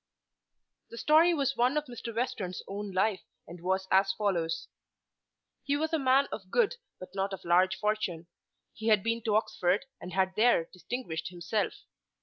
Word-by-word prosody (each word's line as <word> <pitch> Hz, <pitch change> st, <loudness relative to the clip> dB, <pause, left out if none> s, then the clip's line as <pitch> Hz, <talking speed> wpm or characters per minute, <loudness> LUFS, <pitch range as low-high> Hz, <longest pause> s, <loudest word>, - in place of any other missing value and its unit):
The 230 Hz, -, -10 dB
story 315 Hz, +6 st, +5 dB
was 275 Hz, -2 st, 0 dB
one 250 Hz, +5 st, +2 dB
of 300 Hz, -, 0 dB
Mr. 240 Hz, -2 st, -7 dB
Western's 225 Hz, -7 st, -2 dB
own 200 Hz, +1 st, -5 dB
life 190 Hz, +1 st, +1 dB, 0.3 s
and 170 Hz, 0 st, -10 dB
was 190 Hz, +1 st, 0 dB
as 195 Hz, +1 st, +4 dB
follows. 170 Hz, -6 st, -1 dB, 1.0 s
He 285 Hz, 0 st, +1 dB
was 315 Hz, +2 st, -2 dB
a 320 Hz, -, +2 dB
man 270 Hz, +1 st, +4 dB
of 190 Hz, -3 st, -7 dB
good 480 Hz, -, +2 dB, 0.2 s
but 185 Hz, 0 st, -10 dB
not 195 Hz, 0 st, -1 dB
of 190 Hz, -, -7 dB
large 185 Hz, +3 st, +4 dB
fortune. 210 Hz, -6 st, -1 dB, 0.5 s
He 220 Hz, -, -6 dB
had 210 Hz, -3 st, +4 dB
been 230 Hz, 0 st, 0 dB
to 215 Hz, -2 st, +2 dB
Oxford 205 Hz, 0 st, +1 dB, 0.2 s
and 180 Hz, -, -8 dB
had 190 Hz, 0 st, +1 dB
there 220 Hz, -7 st, +4 dB
distinguished 185 Hz, -1 st, -4 dB
himself. 180 Hz, +4 st, -2 dB
205 Hz, 165 wpm, -30 LUFS, 185-245 Hz, 1.0 s, story